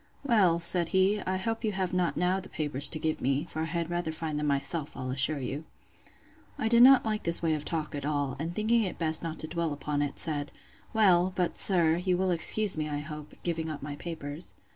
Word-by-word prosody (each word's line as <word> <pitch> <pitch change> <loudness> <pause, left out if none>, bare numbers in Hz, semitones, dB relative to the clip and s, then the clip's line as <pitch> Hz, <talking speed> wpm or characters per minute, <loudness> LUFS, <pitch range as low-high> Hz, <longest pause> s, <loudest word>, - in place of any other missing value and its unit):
Well, 200 -10 +2
said 170 0 +6
he, 195 +2 +2
I 185 0 -1
hope 225 +4 -4
you 215 -2 -1
have 185 -1 -3
not 180 -2 -1
now 180 +2 0
the 190 - -10
papers 145 -2 +1
to 160 - -4
give 155 0 -3
me; 135 +4 -1
for 160 - -6
I - - -1
had 170 +1 -4
rather 175 -2 -3
find 155 -1 -4
them 150 - -2
myself, 140 +2 -2
I'll 130 -1 -5
assure 140 +3 +1
you. 140 +3 -5 0.9
I - - -2
did 235 +1 +5
not 265 0 +7
like 215 -1 -2
this 170 0 +4
way 160 -1 +1
of 150 -1 -4
talk 160 -3 -4
at 145 -1 -6
all; 145 -2 -2
and 165 +3 -4
thinking 225 +2 +1
it 190 -4 -4
best 160 -1 0
not 165 -1 -6
to 155 - -5
dwell 165 0 -3
upon 145 0 -3
it, 145 -1 -3
said, 145 -3 -2 0.4
Well, 190 -4 +3
but, 180 -2 -1
sir, 170 -4 +3
you 180 0 -1
will 185 0 0
excuse 190 +4 +5
me, 155 -1 -4
I 145 - -3
hope, 150 0 -9
giving 165 -2 -3
up 150 -3 -7
my 145 0 -6
papers. 155 0 -5
165 Hz, 230 wpm, -28 LUFS, 150-185 Hz, 0.9 s, not